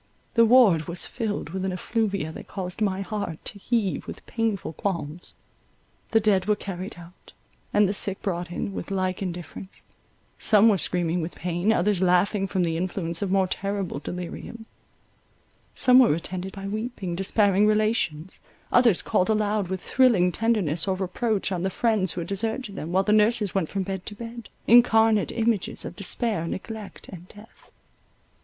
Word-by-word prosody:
The 230 0 +5
ward 215 - +5
was 170 +1 -2
filled 210 - -4
with 190 +1 -4
an 190 - -1
effluvia 200 -3 -2
that - - -10
caused 185 +1 -6
my 195 -2 0
heart 195 -5 -5
to 200 - -6
heave 220 -3 -1
with - - -9
painful 220 -8 -2
qualms. 170 -3 -4 0.7
The 225 - +4
dead 200 -3 +2
were 210 - +3
carried 195 0 -6
out, 175 +1 -15 0.4
and 205 -1 +4
the 195 - -1
sick 195 -1 +1
brought 180 -3 -2
in, 195 +3 -4
with - - -6
like 185 -1 -1
indifference; 180 0 -7 0.6
some 215 +1 +5
were 200 -3 +2
screaming 175 -1 0
with 165 +2 -5
pain, 175 +4 0
others 200 -2 +1
laughing 190 +2 +2
from 185 -1 0
the 165 -1 -1
influence 170 -1 -3
of 200 - -1
more 190 0 +3
terrible 195 -3 -3
delirium; 180 +8 -7 1.1
some 255 0 +6
were 240 - +5
attended 180 +3 -5
by 195 -1 -7
weeping, 215 -3 -4
despairing 200 +2 +3
relations, 210 -6 0 0.3
others 240 -7 +4
called 185 - +1
aloud 210 -2 +1
with 185 0 -4
thrilling 225 -9 +3
tenderness 200 -7 0
or 190 - +1
reproach 195 +3 -1
on 180 -2 -2
the 190 - 0
friends 205 -3 +1
who 175 - -4
had 165 - -6
deserted 220 +2 -3
them, 160 - -5
while 190 +2 +3
the 210 - +2
nurses 215 -1 +3
went 190 -5 0
from 195 -1 -2
bed 190 -1 -5
to 210 - -6
bed, 235 +1 -9 0.2
incarnate 225 -2 +5
images 225 -4 -1
of - - -7
despair, 200 -2 +1
neglect, 215 +3 -7
and 180 -1 -10
death. 210 +3 -17
195 Hz, 170 wpm, -25 LUFS, 180-215 Hz, 1.1 s, some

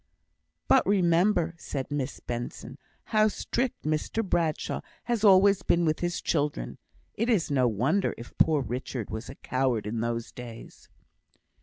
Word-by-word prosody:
"But - - +5
remember," 175 -2 +3
said 135 -2 -4
Mr 145 -2 -3
Benson, 120 +2 -5 0.3
"how 215 0 +5
strict 240 +3 -2
Mr 155 +8 -1
Bradshaw 165 -4 0 0.2
has 235 -3 -1
always 195 -1 +6
been 175 -1 +2
with 155 -1 +1
his 175 0 -2
children. 145 - -1 0.3
It 230 +3 -1
is 190 -10 +2
no 130 -3 +3
wonder 130 - +1
if 115 - -11
poor 155 -3 +4
Richard 125 -1 -4
was 110 +2 -5
a 135 - -8
coward 130 -6 -1
in 110 +2 -3
those 115 0 -2
days." 120 -2 -11
150 Hz, 145 wpm, -28 LUFS, 125-190 Hz, 0.3 s, always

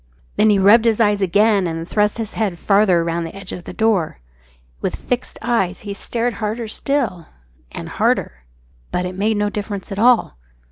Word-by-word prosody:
Then 215 - +4
he 205 - +4
rubbed 210 +4 +6
his 225 -1 +2
eyes 205 -2 +2
again 200 +1 +3
and 165 0 -4
thrust 210 +2 +1
his 225 -2 -5
head 205 -6 -1
farther 195 -3 +3
round 170 0 -2
the 165 - -10
edge 195 -1 -8
of 175 - -7
the - - -7
door. 210 - 0 0.6
With - - -2
fixed 250 0 -4
eyes 195 -6 0
he 205 -1 -5
stared 235 +4 -2
harder 220 +2 -2
still, 215 - -2 0.4
and - - -7
harder. 65 0 -1 0.5
But 180 - -1
it 180 - -4
made 210 +3 0
no 205 0 0
difference 205 -2 -5
at 195 - -4
all. 235 - +3
205 Hz, 185 wpm, -19 LUFS, 180-225 Hz, 0.6 s, rubbed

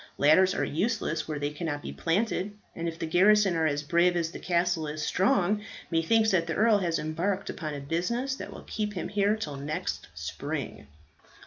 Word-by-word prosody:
Ladders 180 +6 +5
are - - 0
useless 165 -2 -1
where 155 -1 -3
they 145 0 -2
cannot 150 -1 -4
be - - -6
planted; 205 +3 -1 0.2
and 170 - -3
if 165 -1 -4
the - - -3
garrison 190 +3 +4
are 160 -1 +2
as 145 0 -1
brave 175 +4 +3
as 165 -1 0
the - - -8
castle 175 -2 0
is 150 0 -4
strong, 195 +3 +2 0.3
methinks 215 +7 +3
that 170 -3 +2
the 160 - -2
earl 215 -1 +4
has 170 -3 0
embarked 170 +6 -2
upon 155 -4 -5
a - - -4
business 180 - -1
that - - -7
will - - -10
keep 210 -1 -3
him 180 - -4
here 205 0 +2
till 150 -10 -5
next 155 +6 -4
spring." 70 - -5
170 Hz, 195 wpm, -28 LUFS, 155-205 Hz, 0.3 s, Ladders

